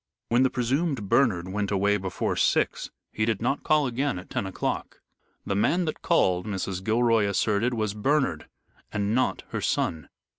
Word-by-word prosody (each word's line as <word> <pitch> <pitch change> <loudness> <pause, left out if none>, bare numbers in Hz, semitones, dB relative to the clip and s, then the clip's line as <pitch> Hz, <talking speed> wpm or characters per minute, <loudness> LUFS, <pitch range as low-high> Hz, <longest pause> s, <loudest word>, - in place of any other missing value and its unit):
When 120 +2 +3
the 130 - +4
presumed 130 - -1
Bernard 95 -10 +2
went 100 +1 -2
away 100 +1 +2
before 95 -2 -2
six, - - +1 0.2
he 110 - -2
did 110 -2 0
not 130 +5 -1
call 150 -2 +3
again 130 -1 -1
at 90 - -10
ten 95 - -2
o'clock. 95 - -3 0.5
The - - -1
man 170 - +2
that 155 - -4
called, 90 +2 +2
Mrs. 95 -2 -3
Gilroy 115 -1 +3
asserted, 105 +4 +1
was 110 -2 -1
Bernard, 105 - 0 0.4
and 105 0 -1
not 130 +2 0
her - - -3
son. 80 -2 -1
110 Hz, 165 wpm, -26 LUFS, 100-125 Hz, 0.5 s, the